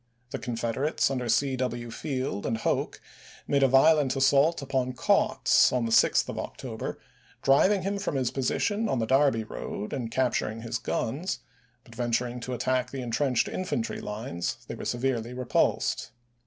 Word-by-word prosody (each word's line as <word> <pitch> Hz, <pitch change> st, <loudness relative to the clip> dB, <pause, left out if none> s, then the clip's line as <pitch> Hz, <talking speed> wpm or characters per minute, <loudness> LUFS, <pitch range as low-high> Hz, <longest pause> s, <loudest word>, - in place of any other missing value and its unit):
The -, -, -3 dB
Confederates 120 Hz, +5 st, -1 dB
under 125 Hz, -3 st, -2 dB
C. 135 Hz, +3 st, +2 dB
W. 120 Hz, -2 st, -3 dB
Field 130 Hz, -6 st, -3 dB
and 110 Hz, -, 0 dB
Hoke -, -, -1 dB, 0.5 s
made 140 Hz, -1 st, +2 dB
a 135 Hz, -, +6 dB
violent 135 Hz, +1 st, +4 dB
assault 140 Hz, +4 st, +4 dB
upon 130 Hz, -2 st, -1 dB
Kautz -, -, +3 dB
on 125 Hz, -2 st, 0 dB
the 115 Hz, -, -2 dB
6th -, -, +4 dB
of -, -, -5 dB
October, -, -, -5 dB, 0.5 s
driving 185 Hz, +9 st, +4 dB
him 200 Hz, +1 st, -1 dB
from 195 Hz, -7 st, -2 dB
his 130 Hz, -3 st, 0 dB
position 205 Hz, -, 0 dB
on -, -, +1 dB
the 115 Hz, -, 0 dB
Darby 135 Hz, -2 st, +3 dB
road 105 Hz, -1 st, -6 dB
and 120 Hz, -4 st, -3 dB
capturing 115 Hz, -3 st, -1 dB
his 115 Hz, 0 st, -3 dB
guns; 150 Hz, +11 st, -2 dB, 0.4 s
but 115 Hz, -, -16 dB
venturing 120 Hz, +1 st, -1 dB
to 125 Hz, +2 st, -5 dB
attack 125 Hz, +1 st, 0 dB
the 135 Hz, -1 st, -5 dB
intrenched 125 Hz, +1 st, +1 dB
infantry 150 Hz, -11 st, -3 dB
lines 105 Hz, -5 st, -4 dB
they -, -, -5 dB
were -, -, -7 dB
severely 120 Hz, -1 st, -1 dB
repulsed. 125 Hz, -1 st, 0 dB
130 Hz, 160 wpm, -27 LUFS, 115-140 Hz, 0.5 s, a